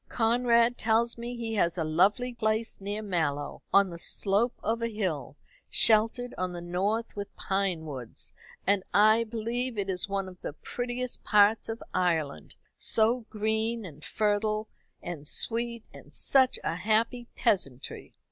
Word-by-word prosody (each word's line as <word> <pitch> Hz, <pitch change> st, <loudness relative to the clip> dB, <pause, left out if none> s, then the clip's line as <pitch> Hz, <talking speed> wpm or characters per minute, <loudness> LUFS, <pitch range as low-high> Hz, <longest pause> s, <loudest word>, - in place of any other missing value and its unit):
Conrad 235 Hz, 0 st, +3 dB
tells 230 Hz, +1 st, +2 dB
me 240 Hz, +1 st, -6 dB
he 230 Hz, -1 st, -3 dB
has 175 Hz, -5 st, +1 dB
a 165 Hz, -, 0 dB
lovely 195 Hz, +11 st, +2 dB
place 220 Hz, -1 st, -1 dB
near 205 Hz, +2 st, -4 dB
Mallow 160 Hz, -7 st, -2 dB
on 200 Hz, -2 st, +5 dB
the 170 Hz, -, -8 dB
slope 205 Hz, +7 st, +1 dB
of 225 Hz, +2 st, 0 dB
a 230 Hz, -, +1 dB
hill, 170 Hz, -, -3 dB, 0.3 s
sheltered 230 Hz, +3 st, +4 dB
on 180 Hz, -1 st, -1 dB
the 175 Hz, -, -5 dB
north 195 Hz, +7 st, -1 dB
with 205 Hz, -1 st, -6 dB
pine 190 Hz, -4 st, -1 dB
woods; 130 Hz, -6 st, -5 dB, 0.3 s
and 200 Hz, 0 st, +3 dB
I 215 Hz, +2 st, +6 dB
believe 230 Hz, +2 st, -3 dB
it 195 Hz, -1 st, -1 dB
is 180 Hz, +2 st, -2 dB
one 195 Hz, -1 st, -1 dB
of 180 Hz, -1 st, -12 dB
the -, -, -5 dB
prettiest 245 Hz, +7 st, -4 dB
parts 210 Hz, +1 st, +4 dB
of 225 Hz, +1 st, -5 dB
Ireland 165 Hz, -6 st, -1 dB, 0.2 s
so 225 Hz, +1 st, +2 dB
green, 220 Hz, +1 st, -1 dB
and 155 Hz, -3 st, -11 dB
fertile, 215 Hz, +1 st, 0 dB, 0.4 s
and 160 Hz, -4 st, -6 dB
sweet, 235 Hz, +4 st, 0 dB
and -, -, -14 dB
such 260 Hz, -2 st, +4 dB
a 165 Hz, -, -1 dB
happy 225 Hz, +5 st, +1 dB
peasantry." 140 Hz, -, -1 dB
215 Hz, 150 wpm, -28 LUFS, 180-230 Hz, 0.4 s, I